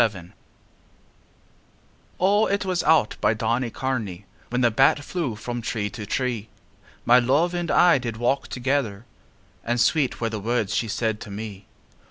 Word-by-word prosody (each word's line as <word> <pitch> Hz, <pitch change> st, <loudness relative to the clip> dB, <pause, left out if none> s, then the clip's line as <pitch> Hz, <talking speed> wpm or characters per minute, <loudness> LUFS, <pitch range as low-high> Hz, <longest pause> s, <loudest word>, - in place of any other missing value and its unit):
XXXI 90 Hz, -6 st, -1 dB, 1.9 s
O, 205 Hz, +4 st, +3 dB
it 200 Hz, 0 st, -1 dB
was 185 Hz, -2 st, 0 dB
out 155 Hz, -8 st, +3 dB
by 110 Hz, -, +3 dB
Donnycarney 115 Hz, -3 st, -2 dB, 0.3 s
When 125 Hz, +1 st, -1 dB
the 120 Hz, -1 st, +4 dB
bat 135 Hz, +5 st, +3 dB
flew 150 Hz, -9 st, -3 dB
from 120 Hz, +2 st, -5 dB
tree 110 Hz, -3 st, -3 dB
to 105 Hz, +2 st, -7 dB
tree 120 Hz, -4 st, -2 dB, 0.6 s
My 120 Hz, +1 st, +6 dB
love 145 Hz, +8 st, +2 dB
and 175 Hz, -1 st, -2 dB
I 175 Hz, -5 st, +5 dB
did 120 Hz, -3 st, -5 dB
walk 120 Hz, +4 st, 0 dB
together; 125 Hz, -5 st, -2 dB, 0.6 s
And 120 Hz, +1 st, -1 dB
sweet 135 Hz, +4 st, +2 dB
were 115 Hz, -, -1 dB
the 110 Hz, -, -3 dB
words 110 Hz, -1 st, -1 dB
she 115 Hz, -, 0 dB
said 110 Hz, 0 st, -2 dB
to 105 Hz, -, -8 dB
me. 100 Hz, -1 st, -7 dB
120 Hz, 155 wpm, -24 LUFS, 110-135 Hz, 1.9 s, My